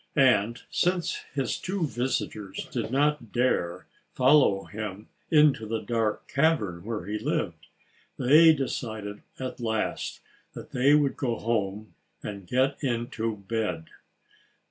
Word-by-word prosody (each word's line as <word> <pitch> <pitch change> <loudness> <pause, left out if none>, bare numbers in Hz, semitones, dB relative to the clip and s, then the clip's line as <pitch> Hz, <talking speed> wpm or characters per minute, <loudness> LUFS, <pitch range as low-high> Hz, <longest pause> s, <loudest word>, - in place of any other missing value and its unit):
And 120 -5 +3
since 180 - +1 0.2
his - - -1
two 185 -2 -1
visitors 120 -6 -3
did - - -2
not 145 -2 +1
dare 120 -9 0 0.3
follow 130 -7 +5
him 105 -1 -7 0.2
into 150 -8 +4
the 115 +1 -1
dark 115 -3 -1
cavern 135 - +1
where 105 -4 -4
he 105 +2 -3
lived, - - -2 0.5
they 155 +6 +7
decided 110 -8 -3 0.2
at 130 -1 -5
last 110 -2 -2 0.3
that - - -10
they 135 +4 +4
would 145 -2 +2
go 120 -4 0
home—and 105 -2 -4
get 130 - +1
into 115 -3 -2
bed. 105 -8 -2
120 Hz, 120 wpm, -27 LUFS, 105-140 Hz, 0.5 s, they